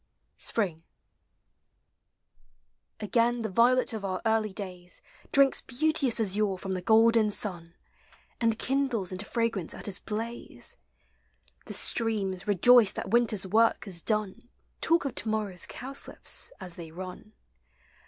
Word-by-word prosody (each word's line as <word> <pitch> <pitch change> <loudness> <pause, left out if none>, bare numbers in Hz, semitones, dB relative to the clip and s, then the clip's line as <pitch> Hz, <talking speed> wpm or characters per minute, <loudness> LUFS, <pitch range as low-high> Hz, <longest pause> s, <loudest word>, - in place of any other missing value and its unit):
SPRING. 180 -8 -1 2.2
Again 230 +3 +1
the 220 - -3
violet 245 +4 +3
of 220 -2 -5
our 185 -2 -2
early 220 -1 +1
days 180 -3 -8 0.3
Drinks 275 -1 +4
beauteous 270 -2 +1
azure 205 -2 +1
from 190 +1 -4
the 185 - -3
golden 225 +2 +4
sun, 175 -5 -1 0.6
And 230 -2 +1
kindles 255 -9 0
into 185 +3 -3
fragrance 230 -7 -2
at - - -4
his 200 -2 -1
blaze; 225 - -5 0.9
The - - -7
streams, 200 -4 -2
rejoiced 215 +2 +5
that 190 - -5
winter's 225 -5 +3
work 225 +5 +2
is 180 -4 -2
done, 215 +2 -2 0.3
Talk 335 -2 +3
of 275 - -2
to 225 - -3
morrow's 210 -5 -1
cowslips, 275 - -4
as 175 -2 -5
they 165 -2 -8
run. 185 +6 -9
215 Hz, 125 wpm, -28 LUFS, 190-235 Hz, 2.2 s, rejoiced